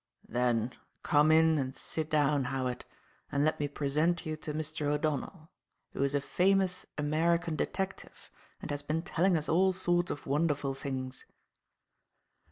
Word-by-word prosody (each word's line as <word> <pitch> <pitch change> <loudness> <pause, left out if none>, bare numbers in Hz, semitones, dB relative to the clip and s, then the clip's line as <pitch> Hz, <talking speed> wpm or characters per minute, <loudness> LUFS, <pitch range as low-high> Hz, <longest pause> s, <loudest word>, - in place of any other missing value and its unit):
"Then, 120 -1 +1 0.3
come 150 +1 +4
in 160 -1 +5
and 130 0 -3
sit 160 -1 -4
down, 145 -3 +2
Howard, 125 -1 -2 0.5
and 140 +1 +2
let 155 - +1
me 145 - 0
present 150 +5 0
you 155 0 -2
to 155 - -5
Mr. 155 0 -3
O'Donnell, 155 +3 -2 0.4
who - - -4
is 140 +1 +2
a - - +3
famous 185 +3 +1
American 165 +3 +1
detective 190 +5 -4 0.3
and - - -4
has 145 0 -2
been 155 +3 -2
telling 180 +1 +2
us 155 - -3
all 190 +3 +3
sorts 175 -1 +1
of 145 - -5
wonderful 145 -1 0
things." 130 -1 -5
155 Hz, 150 wpm, -31 LUFS, 140-165 Hz, 0.5 s, in